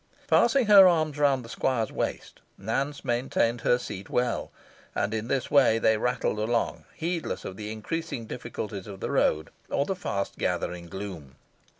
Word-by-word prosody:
Passing 240 Hz, +2 st, +4 dB
her 200 Hz, -3 st, +9 dB
arms 155 Hz, -4 st, +1 dB
round 135 Hz, -4 st, +3 dB
the -, -, -10 dB
squire's 115 Hz, -1 st, -1 dB
waist, -, -, -4 dB, 0.2 s
Nance 135 Hz, +8 st, -2 dB
maintained 120 Hz, -1 st, 0 dB
her 120 Hz, -, +3 dB
seat 95 Hz, -5 st, -7 dB
well; 125 Hz, -1 st, -1 dB, 0.4 s
and 105 Hz, +2 st, 0 dB
in 110 Hz, 0 st, -2 dB
this 130 Hz, -1 st, -1 dB
way 135 Hz, -6 st, +5 dB
they 110 Hz, -1 st, +3 dB
rattled 120 Hz, -1 st, 0 dB
along, 115 Hz, +2 st, -1 dB
heedless 170 Hz, 0 st, -3 dB
of 95 Hz, -, -6 dB
the 105 Hz, +1 st, -6 dB
increasing 120 Hz, +3 st, -4 dB
difficulties 110 Hz, -4 st, -6 dB
of 100 Hz, -2 st, -8 dB
the -, -, -3 dB
road, 80 Hz, 0 st, +1 dB, 0.2 s
or 140 Hz, -, +1 dB
the 195 Hz, -, -2 dB
fast 100 Hz, -, -3 dB
gathering 85 Hz, -1 st, -2 dB
gloom. 85 Hz, -7 st, -7 dB
120 Hz, 165 wpm, -27 LUFS, 105-145 Hz, 0.4 s, her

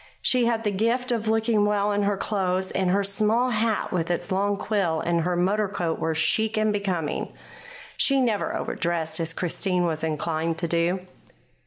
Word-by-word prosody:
She 250 Hz, -2 st, +3 dB
had 230 Hz, -1 st, 0 dB
the 210 Hz, -, +1 dB
gift 235 Hz, +5 st, 0 dB
of 230 Hz, -2 st, -1 dB
looking 220 Hz, -1 st, +2 dB
well 205 Hz, 0 st, +1 dB
in 205 Hz, 0 st, +1 dB
her 200 Hz, 0 st, +1 dB
clothes, 190 Hz, -2 st, -1 dB
and 190 Hz, -1 st, 0 dB
her 200 Hz, +2 st, +2 dB
small 215 Hz, +5 st, +1 dB
hat 220 Hz, -1 st, 0 dB
with 170 Hz, -2 st, -1 dB
its 175 Hz, +1 st, -2 dB
long 200 Hz, +2 st, +1 dB
quill 195 Hz, -7 st, 0 dB
and 170 Hz, 0 st, 0 dB
her 175 Hz, +2 st, 0 dB
motor 200 Hz, +4 st, +1 dB
coat 175 Hz, -4 st, -2 dB
were 160 Hz, 0 st, -1 dB
chic 220 Hz, +7 st, +1 dB
and 215 Hz, 0 st, +2 dB
becoming. 185 Hz, -7 st, -2 dB, 0.7 s
She 275 Hz, -1 st, +3 dB
never 230 Hz, -5 st, 0 dB
overdressed, 165 Hz, -2 st, -1 dB
as 165 Hz, 0 st, -3 dB
Christine 180 Hz, 0 st, 0 dB
was 160 Hz, -2 st, -2 dB
inclined 160 Hz, +1 st, -1 dB
to 170 Hz, +1 st, -2 dB
do. 170 Hz, +3 st, +1 dB
195 Hz, 180 wpm, -25 LUFS, 170-215 Hz, 0.7 s, She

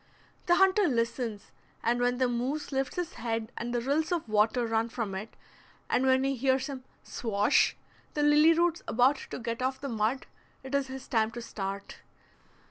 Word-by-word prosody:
The 350 Hz, -, +5 dB
hunter 385 Hz, +1 st, +4 dB
listens, 230 Hz, -3 st, -2 dB, 0.3 s
and 240 Hz, +1 st, +1 dB
when 245 Hz, 0 st, +2 dB
the 255 Hz, 0 st, +2 dB
moose 250 Hz, +6 st, -2 dB
lifts 270 Hz, 0 st, -1 dB
his 355 Hz, -2 st, -3 dB
head 225 Hz, -1 st, -2 dB
and 240 Hz, +1 st, -4 dB
the 240 Hz, -1 st, 0 dB
rills 295 Hz, +6 st, 0 dB
of 340 Hz, -7 st, -1 dB
water 215 Hz, +3 st, +2 dB
run 225 Hz, 0 st, 0 dB
from 225 Hz, -4 st, -4 dB
it, 200 Hz, +4 st, -6 dB, 0.6 s
and 260 Hz, +1 st, +3 dB
he 275 Hz, 0 st, +1 dB
hears 265 Hz, +1 st, +1 dB
him 270 Hz, -2 st, -6 dB, 0.2 s
"swash" 210 Hz, -3 st, +1 dB, 0.4 s
the 295 Hz, -, +1 dB
lily 300 Hz, +2 st, +6 dB
roots 340 Hz, 0 st, +1 dB
about 255 Hz, +5 st, +3 dB
to -, -, -5 dB
get 230 Hz, 0 st, -4 dB
off 260 Hz, +1 st, -1 dB
the 280 Hz, -, -5 dB
mud, 225 Hz, +3 st, -1 dB, 0.4 s
it 265 Hz, +1 st, -8 dB
is 280 Hz, -1 st, +1 dB
his 265 Hz, 0 st, -8 dB
time 220 Hz, -2 st, +2 dB
to 240 Hz, -, -6 dB
start. 200 Hz, -2 st, -5 dB
250 Hz, 180 wpm, -29 LUFS, 230-275 Hz, 0.6 s, lily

